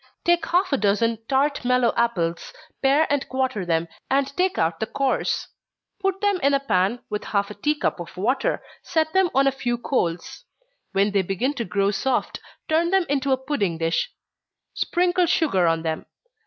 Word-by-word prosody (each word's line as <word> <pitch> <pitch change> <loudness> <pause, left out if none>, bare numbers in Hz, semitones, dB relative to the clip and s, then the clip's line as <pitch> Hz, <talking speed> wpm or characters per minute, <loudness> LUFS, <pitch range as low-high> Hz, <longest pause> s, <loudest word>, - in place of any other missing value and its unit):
_ - - -51
Take 345 -2 +2
half 360 -1 +1
a - - +4
dozen 215 +3 +1
tart 280 +1 +1
mellow 250 -1 +2
apples 175 - -1 0.3
pare 280 +4 +4
and 285 - -1
quarter 260 -8 -1
them, 165 0 +1 0.2
and 275 +1 +1
take 365 +1 +1
out 165 0 0
the 220 - -1
cores. 275 +1 -1 0.5
Put 390 -1 -1
them 405 -2 +2
in 280 +1 +3
a - - +2
pan, 220 -3 +1
with 210 - -2
half 200 0 -1
a - - -5
tea 295 +9 0
cup 295 - -1
of 175 +1 -9
water 255 +8 0 0.2
set 315 -1 0
them 380 -1 +3
on 270 +1 +4
a 275 - +4
few 245 -3 -2
coals. 230 - -2 0.5
When 200 +1 +2
they 200 -1 +2
begin 195 +9 -1
to 235 -5 -3
grow 200 +1 +1
soft, 250 +5 -1 0.3
turn 330 +2 +2
them 385 -1 +3
into 275 -1 0
a 260 - +4
pudding 255 - -1
dish, 165 - 0 0.6
sprinkle 355 0 +1
sugar 195 - +2
on 165 0 +1
them. 160 -1 -3
260 Hz, 185 wpm, -23 LUFS, 200-300 Hz, 0.6 s, a